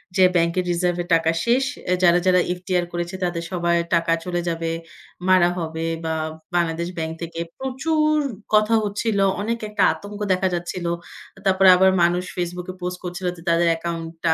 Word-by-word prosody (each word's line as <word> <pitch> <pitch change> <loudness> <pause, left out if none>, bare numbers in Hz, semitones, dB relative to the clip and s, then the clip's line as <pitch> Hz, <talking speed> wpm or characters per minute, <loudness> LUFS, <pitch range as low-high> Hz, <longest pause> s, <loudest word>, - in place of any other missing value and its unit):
যে 190 - +5
ব্যাংকের 170 +1 +2
রিজার্ভে 175 0 0
টাকা 165 0 +3
শেষ। 245 +3 +3 0.3
এহ 180 - +3
যারা, 175 0 +6
যারা 180 -1 +5 0.2
FDR 180 -1 -1
করেছে 175 +1 -3
তাদের 175 -1 -1
সবার 170 -2 +1 0.2
টাকা 170 0 +1
চলে 175 -1 -1
যাবে, 165 0 -2 0.6
মারা 185 -2 +5
হবে, 160 -1 -3 0.2
বা 160 0 -1 0.4
বাংলাদেশ 170 -1 0
ব্যাংক 160 0 -2
থেকে 165 0 -6 0.2
প্রচুর 305 +4 +1 0.4
কথা 215 +1 +4
হচ্ছিল। 205 +1 -1 0.2
অনেক 230 +3 -2
একটা 210 -2 +1
আতঙ্ক 205 +5 -9
দেখা 185 +1 +1
যাচ্ছিল। 175 0 -4 0.5
আ - - -13
তারপরে 190 0 +5
আবার 190 +1 +5
মানুষ 175 +1 +2
Facebook 180 0 -4
এ - - -11
পোস্ট 180 0 -3
করছিল 180 +1 -5
যে - - -12
তাদের 170 0 +3
অ্যাকাউন্টটা 165 0 -2
175 Hz, 165 wpm, -22 LUFS, 170-190 Hz, 0.6 s, যারা